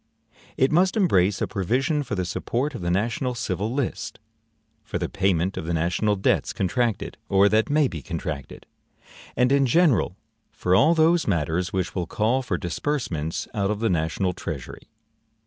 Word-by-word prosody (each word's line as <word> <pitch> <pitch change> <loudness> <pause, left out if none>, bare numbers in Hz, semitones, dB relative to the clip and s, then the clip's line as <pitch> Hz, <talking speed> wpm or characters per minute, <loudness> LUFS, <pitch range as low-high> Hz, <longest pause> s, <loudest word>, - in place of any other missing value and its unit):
It 130 - +3
must 185 +5 +3
embrace 100 - +3
a - - 0
provision 130 - 0
for 125 -7 -4
the 90 -2 -1
support 125 - -2
of 120 - -6
the 85 - -2
national 115 +7 0
civil 105 -1 -2
list; 135 0 -3 0.7
for - - -4
the - - -2
payment 95 -1 0
of - - -4
the 85 +1 -1
national 90 +6 +1
debts 95 - +1
contracted, 115 +3 -1
or 100 +1 +5
that 110 +1 +2
may 150 -1 +3
be 80 - -6
contracted; 70 0 -6 0.7
and, 125 +1 +3
in 140 -1 +4
general, 155 - +3 0.3
for 90 - -1
all 155 - +5
those 165 +1 +3
matters 85 -1 0
which 95 0 -2
will 90 -3 -2
call 115 +8 +1
for 105 -9 -2
disbursements 85 - -3
out 100 -3 0
of 105 -1 -1
the 115 -2 +1
national 85 +3 0
treasury. - - -7
105 Hz, 165 wpm, -24 LUFS, 90-130 Hz, 0.7 s, or